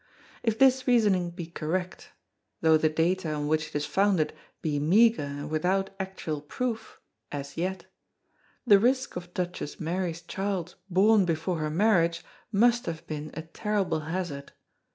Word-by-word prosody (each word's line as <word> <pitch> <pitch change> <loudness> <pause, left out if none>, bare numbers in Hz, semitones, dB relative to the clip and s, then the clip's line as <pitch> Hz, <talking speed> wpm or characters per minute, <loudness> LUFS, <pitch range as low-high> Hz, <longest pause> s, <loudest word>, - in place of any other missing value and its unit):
If 225 -2 0
this 265 0 +4
reasoning 205 -8 +3
be 170 0 -7
correct 170 +3 -4 0.5
though 160 -1 +5
the 155 0 +3
data 165 +1 0
on 145 -1 -2
which 155 0 +1
it - - -14
is 145 0 0
founded 190 -3 +2 0.3
be 150 -2 0
meagre 220 +9 +4
and 145 +1 -5
without 185 +5 +1
actual 190 -6 -4
proof 225 +8 -4 0.3
as 140 -1 -6
yet 185 +1 -3 0.8
the 205 -5 +7
risk 255 +4 +1
of 175 0 -7
Duchess 180 -4 -4
Mary's 170 0 -2
child 190 -1 -3 0.2
born 200 +2 +5
before 165 +1 -1
her 155 0 -1
marriage 170 -1 +2 0.3
must 235 +2 +3
have 165 -1 -4
been 155 0 -5
a 160 - -5
terrible 195 0 -1
hazard. 155 -3 -4
175 Hz, 150 wpm, -28 LUFS, 155-200 Hz, 0.8 s, the